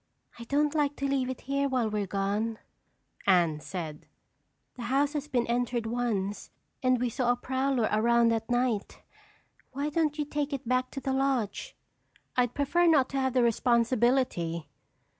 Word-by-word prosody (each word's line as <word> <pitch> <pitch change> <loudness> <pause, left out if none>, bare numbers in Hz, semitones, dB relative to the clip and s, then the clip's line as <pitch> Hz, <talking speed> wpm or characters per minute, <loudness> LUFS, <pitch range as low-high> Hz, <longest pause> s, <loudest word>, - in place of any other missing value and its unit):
"I 235 - -7
don't 290 +4 +1
like 290 -2 +1
to 275 - -2
leave 270 -2 0
it 260 - -5
here 275 +1 -1
while 250 -4 +1
we're 210 -2 -2
gone," 205 +4 -1 0.7
Anne 170 -5 +4
said. 155 -3 -6 0.7
"The 240 - -7
house 280 +3 +2
has 295 -1 -3
been 250 -5 0
entered 240 -1 -1
once 225 -4 -2 0.3
and 255 -2 +3
we 250 - +1
saw 245 +1 +1
a - - +2
prowler 260 -1 0
around 235 +2 +3
at 225 0 -3
night. 245 -4 -1 0.7
Why 285 +3 -2
don't 305 -1 0
you 300 - -1
take 295 0 -2
it 265 -4 -5
back 255 +1 +1
to 275 - -5
the 265 - -1
lodge?" 265 -6 -1 0.6
"I'd 245 -2 +1
prefer 340 +5 +2
not 290 -6 +4
to 275 - -2
have 260 -1 0
the 250 -2 +3
responsibility." 235 -7 +1
250 Hz, 165 wpm, -29 LUFS, 225-275 Hz, 0.7 s, Anne